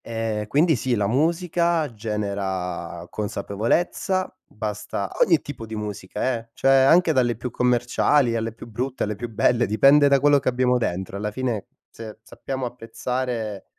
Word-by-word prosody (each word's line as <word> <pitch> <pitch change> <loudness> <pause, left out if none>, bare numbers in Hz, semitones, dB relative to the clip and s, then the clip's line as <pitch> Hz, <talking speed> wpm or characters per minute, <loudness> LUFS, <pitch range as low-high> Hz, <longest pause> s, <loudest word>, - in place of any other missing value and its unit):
Ehm, 110 -2 -3
quindi 155 +7 +3
sì, 125 +1 0
la 105 -2 0
musica 165 - +1
genera 95 -5 -4
consapevolezza, 115 - -1
basta 105 -2 -4
ogni 165 -4 +3
tipo 115 -6 -8
di 110 - -6
musica 105 +3 -3
eh, 115 0 -16
cioè 135 - +2
anche 160 +6 +5
dalle 120 -3 +2
più 120 +2 -6
commerciali, 125 +1 +2
alle 115 0 -2
più 115 - -12
brutte, 125 +4 -3
alle 105 0 -2
più 120 +4 -6
belle, 120 +2 +2
dipende 140 +7 +5
da 140 -1 +4
quello 145 +1 +4
che 130 - 0
abbiamo 125 0 +2
dentro. 95 -3 -3
Alla 105 +1 -2
fine 115 -1 -3 0.2
se 110 -2 -9
sappiamo 130 -1 -5
apprezzare 120 -3 -4
120 Hz, 150 wpm, -23 LUFS, 105-135 Hz, 0.2 s, anche